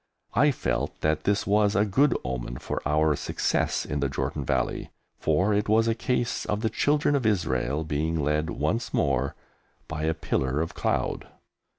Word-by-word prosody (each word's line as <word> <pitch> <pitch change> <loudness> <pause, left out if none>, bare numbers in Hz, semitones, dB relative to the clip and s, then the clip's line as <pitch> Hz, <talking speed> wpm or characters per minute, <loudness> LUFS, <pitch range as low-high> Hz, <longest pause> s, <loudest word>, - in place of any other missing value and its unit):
I 135 +9 +5
felt 135 - -2
that 80 0 0
this 100 0 +1
was 105 0 +3
a 105 +1 +4
good 130 +6 +3
omen - - -4
for - - -4
our 75 0 +3
success - - 0
in 75 - -2
the 70 -1 0
Jordan 65 - -2
Valley, - - -1 0.3
for 90 +7 +2
it 105 0 0
was 110 +1 +4
a 115 - +3
case 120 +1 -1
of 105 0 -2
the 110 - 0
Children 145 0 +2
of 135 - 0
Israel 75 - 0
being 80 +2 -1
led 75 +2 0
once 85 +9 -1
more 70 -1 +1 0.5
by 80 0 -3
a 80 0 +1
pillar 65 -3 -1
of 80 +1 -2
cloud. - - -1
80 Hz, 175 wpm, -26 LUFS, 75-110 Hz, 0.5 s, I